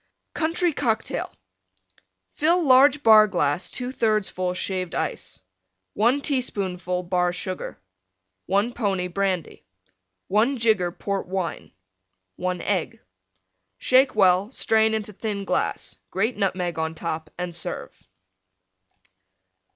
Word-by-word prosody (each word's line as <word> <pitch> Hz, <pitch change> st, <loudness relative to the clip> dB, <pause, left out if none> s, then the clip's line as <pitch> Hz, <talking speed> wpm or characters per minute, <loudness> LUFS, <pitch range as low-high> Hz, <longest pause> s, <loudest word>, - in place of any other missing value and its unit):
COUNTRY 335 Hz, +1 st, +1 dB
COCKTAIL 225 Hz, -6 st, -1 dB, 1.0 s
Fill 335 Hz, +4 st, +2 dB
large 280 Hz, +1 st, +5 dB
Bar 215 Hz, -1 st, +8 dB
glass 175 Hz, -3 st, 0 dB
2/3 225 Hz, -5 st, 0 dB
full 180 Hz, 0 st, -2 dB
Shaved 185 Hz, -2 st, -3 dB
Ice. -, -, -4 dB, 0.5 s
1 240 Hz, +7 st, +2 dB
teaspoonful 185 Hz, -, -2 dB
Bar 180 Hz, 0 st, +1 dB
Sugar. 185 Hz, -, -5 dB, 0.7 s
1 200 Hz, +6 st, +1 dB
pony 195 Hz, -6 st, -1 dB
Brandy. 185 Hz, -2 st, -2 dB, 0.6 s
1 230 Hz, +7 st, +2 dB
jigger 215 Hz, -7 st, +2 dB
Port 195 Hz, +1 st, -4 dB
Wine. 185 Hz, -2 st, -4 dB, 0.7 s
1 180 Hz, 0 st, -2 dB
Egg. 190 Hz, -5 st, -2 dB, 0.8 s
Shake 255 Hz, -, +3 dB
well; 190 Hz, 0 st, +4 dB
strain 220 Hz, -3 st, +2 dB
into 210 Hz, -1 st, -4 dB
thin 200 Hz, -1 st, -4 dB
glass; -, -, -2 dB
grate 220 Hz, +6 st, 0 dB
Nutmeg 185 Hz, -4 st, -1 dB
on 160 Hz, 0 st, -2 dB
top 160 Hz, -1 st, -4 dB
and 180 Hz, -1 st, -4 dB
serve. 170 Hz, -, -5 dB
200 Hz, 105 wpm, -24 LUFS, 180-230 Hz, 1.0 s, Bar